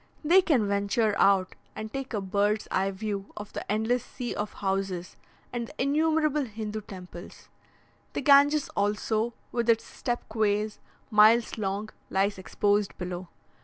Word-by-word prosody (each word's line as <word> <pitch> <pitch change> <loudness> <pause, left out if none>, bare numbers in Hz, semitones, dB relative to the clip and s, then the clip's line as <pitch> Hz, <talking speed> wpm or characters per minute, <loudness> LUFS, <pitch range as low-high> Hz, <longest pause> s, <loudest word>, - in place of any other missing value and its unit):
They 350 +5 +6
can 275 - +2
venture 200 +2 +1
out, 195 -2 +4 0.2
and 215 +1 -6
take 270 -1 -4
a 205 - -1
bird's 205 +2 0
eye 190 +1 +1
view 200 0 -4
of 210 -1 -8
the - - -5
endless 220 +3 +1
sea 245 -1 -5
of 210 0 -4
houses, 190 -2 -2 0.4
and 235 -1 -3
the 300 - -15
innumerable 305 +1 +2
Hindoo 215 -1 -5
temples; 180 -3 -11 0.6
the - - -2
Ganges 285 +1 +5
also, 215 +3 0 0.2
with 235 -1 -1
its 225 -1 +4
step 240 -1 -4
quays, 215 -1 0 0.3
miles 215 +2 +5
long, 200 +1 -2 0.2
lies 195 +1 +1
exposed 205 +2 0
below. 180 0 -5
215 Hz, 145 wpm, -28 LUFS, 200-240 Hz, 0.6 s, They